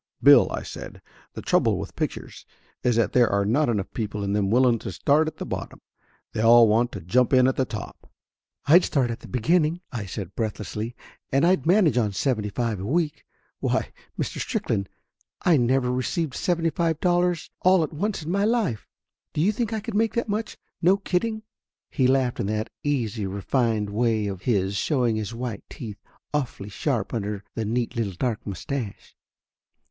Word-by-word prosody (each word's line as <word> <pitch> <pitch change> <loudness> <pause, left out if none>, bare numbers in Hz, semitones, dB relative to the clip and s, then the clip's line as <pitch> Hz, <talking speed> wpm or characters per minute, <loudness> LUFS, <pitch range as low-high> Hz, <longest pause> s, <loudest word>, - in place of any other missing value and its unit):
'Bill,' - - +7
I - - -3
said, - - -8 0.4
'the - - -6
trouble - - +2
with - - -6
pictures - - -4 0.4
is 120 -2 +2
that 115 -1 +1
there 120 -2 +5
are 100 0 +1
not 125 +7 +2
enough 105 -5 -2
people 105 -2 -3
in 100 0 -1
them 100 -2 +1
willing 120 0 +4
to - - -6
start 150 - +2
at 155 - -5
the - - -5
bottom; - - -5 0.5
they 110 - -1
all 115 +1 +7
want 115 +3 +2
to 100 - -6
jump 125 - +2
in 130 -1 +6
at 130 - +1
the 130 - +1
top.' 110 -4 -8 0.3
' - - -52
"I'd 170 +5 +7
start 130 -5 +1
at 115 - -5
the - - -12
beginning," 155 +6 +1
I 110 -6 -4
said 95 -1 -6
breathlessly, 110 +1 -4 0.4
"and 135 +4 +3
I'd 175 -5 +2
manage 170 - +4
on 105 -3 0
seventy 110 -2 0
five 115 -1 -2
a 95 - -5
week! 155 +2 -1 0.3
Why, - - -1 0.3
Mr. - - -3
Strickland, 100 -1 -2 0.5
I 175 - +5
never 125 0 +2
received 130 +4 -1
seventy 165 0 0
five 165 0 0
dollars 175 -1 +1
all 185 -2 +4
at 155 - -4
once 195 +2 -2
in 160 - -4
my 200 +2 +1
life! 215 - 0 0.5
Do - - -3
you 195 +6 +4
think 225 +1 -2
I 220 - -1
could 225 +1 -6
make 220 +2 +1
that 235 - 0
much, 210 +1 -3 0.2
no 185 +3 +5
kidding?" 215 +3 -1 0.5
He 130 -4 +2
laughed 130 -2 +1
in - - -1
that 110 +2 -2
easy, 115 -8 -1
refined 105 +1 0
way 110 -1 +1
of 95 -3 -4
his, 100 -4 0
showing 120 - +1
his 110 +1 -4
white 115 -4 -4
teeth, 105 -4 -8 0.3
awfully 125 -8 -2
sharp 115 0 -2
under 105 -2 -3
the 110 - -3
neat 120 +3 -1
little 110 -5 -1
dark 115 +2 -2
mustache. 105 +3 -5
125 Hz, 190 wpm, -25 LUFS, 110-160 Hz, 0.5 s, Bill